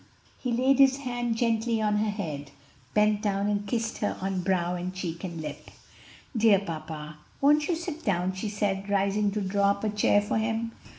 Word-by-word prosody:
He 250 - -2
laid 260 +3 +3
his 270 -1 +6
hand 245 -4 -2
gently 230 -1 +1
on 210 -1 +1
her 215 +1 +1
head, 155 -9 -4 0.5
bent 210 0 +3
down 200 -1 0
and 205 0 -1
kissed 225 +1 -2
her 205 - -1
on 190 -1 -1
brow 180 -1 +1
and 180 +1 -3
cheek 175 -3 -5
and 170 -3 -5
lip. 150 -2 -7 0.7
"Dear 220 -3 +5
papa, 155 -4 -6 0.2
won't 295 +2 +4
you 350 - +1
sit 325 -1 -6
down?" 185 -1 0
she 190 +3 -4
said, 200 -1 -1
rising 200 +1 +2
to 210 - -1
draw 200 +1 +2
up 200 +1 0
a 215 - +1
chair 205 0 +3
for 205 +1 -1
him. 225 +1 -1
205 Hz, 190 wpm, -27 LUFS, 185-225 Hz, 0.7 s, his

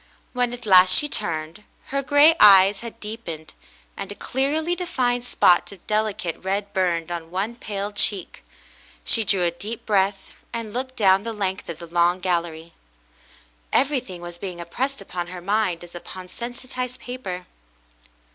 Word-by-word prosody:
When 245 -1 +1
at 245 -1 -7
last 185 -2 +7
she 295 - +4
turned, 165 - -3 0.3
her 275 0 0
gray 290 +3 +6
eyes 195 -1 +8
had 235 -1 -9
deepened, 210 -8 -7 0.4
and 200 - -6
a - - -7
clearly 300 +9 -1
defined 250 -9 -1
spot 180 -7 +3
of 195 -3 -14
delicate 210 -6 -2
red 200 +2 -2
burned 175 -3 0
on 165 -1 -5
one 195 +6 -2
pale 205 -3 -4
cheek. 205 -2 0 0.6
She 225 - +5
drew 195 -3 +2
a 170 - +2
deep 210 +7 -7
breath 195 -2 0 0.2
and 230 -3 -5
looked 260 +1 -4
down 195 -4 +4
the 230 +2 -5
length 195 -3 -3
of 165 - -5
the 170 - -9
long 175 +2 +2
gallery. 170 -2 -2 1.0
Everything 250 -10 0
was 175 0 -8
being 185 -2 -6
impressed 255 +12 -3
upon 175 -1 -5
her 180 0 -7
mind 185 -2 0
as 175 - -13
upon 180 +1 -9
sensitized 250 +2 -6
paper. 195 -9 -6
200 Hz, 155 wpm, -23 LUFS, 175-240 Hz, 1.0 s, eyes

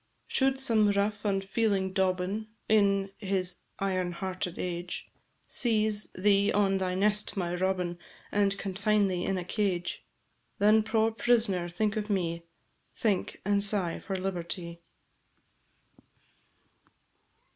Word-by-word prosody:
Should 265 0 +1
some 225 -6 +3
rough, 205 +1 0
unfeeling 195 -1 0
dobbin, 190 +3 0 0.2
In 200 -2 +3
this 190 -2 -1 0.2
iron 185 -2 -1
hearted 185 -1 -4
age, 175 0 -4 0.4
Seize 215 -3 +2
thee 200 +1 +3
on 195 -2 +2
thy 185 -1 -1
nest, 210 +2 +1
my 175 -2 -1
Robin, 180 -1 -1 0.3
And 200 -1 +2
confine 205 +1 +1
thee 180 -1 -2
in 195 - 0
a 180 - -3
cage, 180 -3 -1 0.5
Then, 215 +2 +5
poor 220 +1 +1
prisoner! 215 -6 +1
think 210 +5 -1
of 210 0 -3
me 170 -4 -1 0.5
Think, 205 -5 -1
and 200 0 +2
sigh 195 -5 +1
for 195 - -4
liberty. 170 -2 -4
195 Hz, 115 wpm, -29 LUFS, 185-210 Hz, 0.5 s, Then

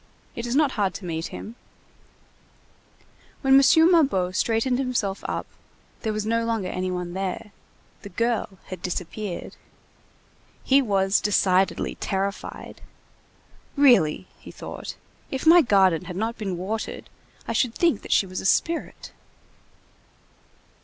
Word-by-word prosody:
It 235 +1 -4
is 240 - -1
not 295 -2 +3
hard 200 -6 -1
to 195 - -7
meet 165 -1 -3
him." 220 - -8 1.9
When 270 -1 +3
M. 270 - +9 0.3
Mabeuf 195 - +2
straightened 235 +4 +1
himself 235 -7 -2
up, - - -3 0.6
there 220 - -1
was 215 0 -3
no 230 +1 +1
longer 225 -5 -1
any 185 0 -2
one 180 -1 -4
there; 190 +2 -4 0.5
the 200 - -9
girl 225 0 -1
had 185 -3 -7
disappeared. 180 +2 -5 1.1
He 275 +1 +4
was 195 -4 +1
decidedly 190 -2 +2
terrified. 195 +1 -4 0.9
"Really," 240 - +4
he - - -12
thought, - - -8 0.3
"if 265 +2 -4
my 340 +2 +8
garden 190 - +3
had 180 - -7
not 225 +4 -2
been 195 -5 -4
watered, 210 +5 -4 0.4
I - - -2
should 240 -3 +1
think 335 - +2
that - - -9
she - - +4
was 185 0 -5
a - - -9
spirit." 335 +9 -1
205 Hz, 130 wpm, -24 LUFS, 185-240 Hz, 1.9 s, M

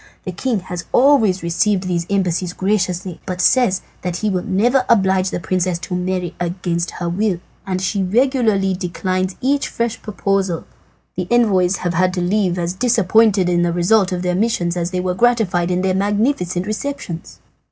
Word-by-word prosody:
The 185 - -4
king 215 +3 -2
has 180 -1 -6
always 225 - +4
received 180 +3 +1
these 175 -2 -2
embassies 185 -2 0
graciously, 185 -3 -1
but 180 -1 -4
says 195 -1 +3 0.2
that 180 -1 -3
he 210 +3 -1
will 185 -1 0
never 230 +7 +2
oblige 190 -3 +3
the - - -3
princess 180 0 -1
to 180 +1 -5
marry 180 -1 -2
against 175 -1 -2
her 175 - -3
will, 185 +1 0 0.3
and 185 -1 -1
as 185 - -2
she 200 +1 -1
regularly 215 -2 +2
declines 185 0 -2
each 280 +2 +1
fresh 235 -1 -3
proposal, 195 -4 -1 0.5
the 180 0 -3
envoys 195 -6 +3
have 175 -1 -2
had 180 +2 +1
to 180 - -1
leave 180 0 +1
as 175 0 -2
disappointed 220 -3 +3
in 175 -1 +2
the 175 0 +1
result 185 +3 +2
of 180 0 -2
their 180 0 0
missions 180 -4 0
as 175 -1 -1
they 180 0 -2
were 180 0 -1
gratified 195 -5 +1
by 180 - +1
their 185 +1 +1
magnificent 200 -2 0
receptions." 215 -6 -5
185 Hz, 175 wpm, -19 LUFS, 180-210 Hz, 0.5 s, always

